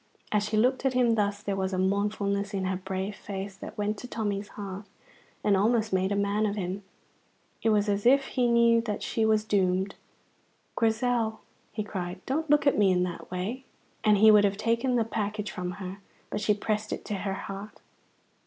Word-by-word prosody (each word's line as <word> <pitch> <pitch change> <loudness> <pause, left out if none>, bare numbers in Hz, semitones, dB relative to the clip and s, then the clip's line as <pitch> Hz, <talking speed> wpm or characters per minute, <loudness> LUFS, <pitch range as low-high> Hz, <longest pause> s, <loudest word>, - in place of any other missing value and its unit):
As 210 -1 +2
she 215 0 -1
looked 255 +5 +2
at 265 -2 +1
him 245 -2 +4
thus 205 -2 0
there 200 -1 -1
was 190 0 -1
a - - 0
mournfulness 200 +1 0
in 190 -1 -1
her 185 0 -1
brave 190 +2 -4
face 195 0 -6
that - - -9
went 210 0 -1
to 250 - -7
Tommy's 205 -4 -2
heart 200 -1 -7 0.6
and 205 - +4
almost 220 +1 +2
made 190 +1 +1
a - - +1
man 200 +2 +1
of 205 - -2
him. 190 0 -3 0.8
It 225 - +2
was 210 -1 +3
as 205 +2 +1
if 270 +2 +4
he 250 -2 +1
knew 235 -1 +5
that 210 -3 -4
she 225 - 0
was 215 -1 +3
doomed. 190 -2 +1 0.8
"Grizel," 225 -1 +1 0.3
he 215 0 -3
cried, 180 -3 -5
"don't 315 +4 -1
look 295 0 +4
at 280 - +3
me 200 -2 +5
in 180 -1 +2
that 175 -1 -5
way!" 195 +9 -3 0.4
And 210 -1 +5
he 215 +2 +8
would 210 -1 +7
have 200 -1 +1
taken 230 +4 +1
the 235 - +3
package 210 -1 -3
from 180 0 -4
her, 190 0 -7 0.3
but 210 - -2
she 210 0 +2
pressed 215 +1 -2
it - - -4
to 210 - -3
her 195 0 -2
heart. 195 +2 -7
205 Hz, 200 wpm, -28 LUFS, 195-225 Hz, 0.8 s, he